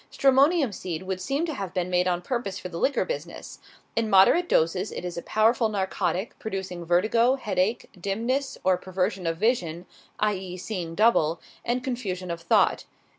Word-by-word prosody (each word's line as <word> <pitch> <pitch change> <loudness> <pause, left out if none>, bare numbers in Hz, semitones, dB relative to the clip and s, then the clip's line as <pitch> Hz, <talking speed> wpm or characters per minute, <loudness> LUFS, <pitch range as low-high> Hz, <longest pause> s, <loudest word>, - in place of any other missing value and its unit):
Stramonium 275 - +4
seed 180 -2 -5
would 185 0 -4
seem 275 - -1
to 320 - -3
have 195 -7 -6
been 180 -1 0
made 180 0 +1
on 175 -1 0
purpose 200 -4 -3
for 180 - -7
the 170 -1 -6
liquor 275 - +1
business. - - -6 0.4
In 225 -1 0
moderate 215 - +5
doses 180 +5 +1
it - - -6
is 175 - -4
a 170 - -4
powerful 225 +3 +2
narcotic, 190 -1 -1
producing 190 -4 -5
vertigo, 215 +9 +3
headache, 210 -3 -1
dimness 230 +9 -2
or 185 -1 +3
perversion 185 -1 -2
of 165 0 -1
vision 180 -6 0 0.3
(i. 210 0 +2
e., 185 -1 -6
seeing 175 -4 -5
double) 175 -7 +3 0.2
and 245 +1 -1
confusion 190 -9 -3
of 170 0 -5
thought. 170 - +2
190 Hz, 175 wpm, -26 LUFS, 180-235 Hz, 0.4 s, moderate